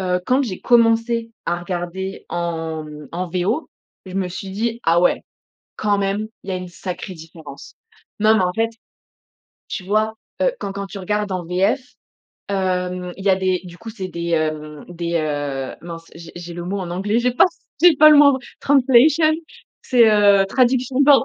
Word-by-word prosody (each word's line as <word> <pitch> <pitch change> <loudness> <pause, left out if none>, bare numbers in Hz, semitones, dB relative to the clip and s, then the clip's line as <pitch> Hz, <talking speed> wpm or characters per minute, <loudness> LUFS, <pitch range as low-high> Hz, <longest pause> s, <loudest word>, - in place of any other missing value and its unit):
heu, 180 -1 0
quand 260 +2 +3
j'ai 195 -8 -4
commencé 230 -1 +3
à 175 +1 -1
regarder 180 +2 -5
en 165 -2 -3 0.3
en 180 +1 -3
VO 195 - -1 0.4
je 185 - -9
me 195 -1 0
suis 190 +2 -7
dis: 230 +4 -2
«Ah 165 +1 +4
ouais, 180 - +2 0.5
quand 205 -1 +1
même, 200 +2 -1 0.2
il 195 - -6
y - - -1
a - - -1
une 180 0 -6
sacrée 180 +2 -6
différence». 160 -3 -12 0.5
Non 215 +1 +5
mais 190 - +2
en 180 - 0
fait, 225 0 0 1.0
tu 185 - -5
vois, 215 +2 +1 0.3
heu, - - +3
quand 195 - -4
quand 200 0 -5
tu 195 - -8
regardes 210 +1 -2
en 180 -1 -3
VF, 195 +9 +1 0.7
hem, 180 -2 -2
il 195 - -9
y - - +2
a 185 - +4
des 185 -1 0
du 175 0 -11
coup, 225 - -10
c'est 190 -4 -6
des, 170 -1 -4
hem, 155 -2 -2
des, 170 -1 -4
heu 145 -4 -2
mince 165 -1 -9
j'ai 165 0 -11
j'ai 175 0 -8
le 175 0 -6
mot 195 +3 -3
en 175 -2 -5
anglais, 205 +5 0
j'ai 250 +1 +2
pas 250 - +5
c 350 - -10 0.2
j'ai 345 -4 +7
pas 305 +1 +8
le 300 - +7
mot 295 - +8
en - - -2
f - - -22 0.2
translation, 285 +3 +4 0.5
c'est, 235 -3 +5
heu, 205 -2 +5
traduction, 255 +2 +1
pardon. 275 -1 +6
190 Hz, 195 wpm, -20 LUFS, 175-225 Hz, 1.0 s, pas